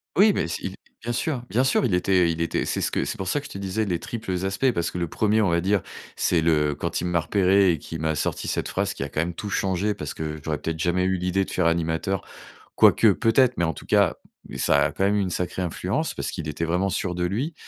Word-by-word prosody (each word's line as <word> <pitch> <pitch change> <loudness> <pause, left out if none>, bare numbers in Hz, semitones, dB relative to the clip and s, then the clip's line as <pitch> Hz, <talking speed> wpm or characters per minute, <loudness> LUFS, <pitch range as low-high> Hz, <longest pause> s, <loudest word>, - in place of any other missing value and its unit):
Oui, 205 +3 +6
mais - - -1
si 95 +3 -4 0.3
bien 120 +2 -3
sûr, 125 +1 -2
bien 125 +4 +2
sûr, 130 -1 +2
il 95 -7 +2
était 90 -1 +3
il 80 - -4
était, 85 - 0
c'est - - -2
ce - - -1
que - - 0
c'est - - -4
pour 95 - -4
ça 145 - +1
que 145 - -9
je - - -15
te - - -6
disais 100 +3 -2
les 90 -3 0
triples 95 -5 -4
aspects, 100 +8 +1
parce 85 -6 -2
que 90 - -4
le 85 - -1
1er, 110 +5 +1
on 100 - +2
va 85 0 +2
dire, 95 +2 +1 0.3
c'est 85 - +2
le 75 -2 +2
quand 85 +3 -2
il - - -2
m'a 90 -1 +1
repéré 95 +3 +3
et 80 - 0
qu'il 80 +2 -7
m'a 80 0 0
sorti 75 - -2
cette - - -1
phrase - - -1
qui - - -9
a - - -5
quand 75 - -1
même 85 +1 -2
tout 105 +4 -6
changé 95 +2 0
parce 75 -6 -5
que 80 -1 -5
j'aurais 75 -3 -2
peut-être 80 -1 -3
jamais 90 +1 +1
eu 95 0 +1
l'idée 90 +2 0
de - - -11
faire 90 - 0
animateur, 85 +3 0 0.5
quoique, 115 - +6
peut-être, 120 +3 +3
mais 85 - +2
en 80 -2 -1
tout - - -11
cas, - - +3 0.4
ça - - +3
a - - -3
quand 95 - -1
même 100 +1 +2
eu 105 - +2
une 95 - -1
sacrée 90 +1 -3
influence 85 - -2
parce - - -3
qu'il 80 -2 -6
était 75 +3 -2
vraiment 90 +4 0
sûr 90 -1 -2
de 90 0 -1
lui, 125 - -2
90 Hz, 270 wpm, -24 LUFS, 85-100 Hz, 0.5 s, Oui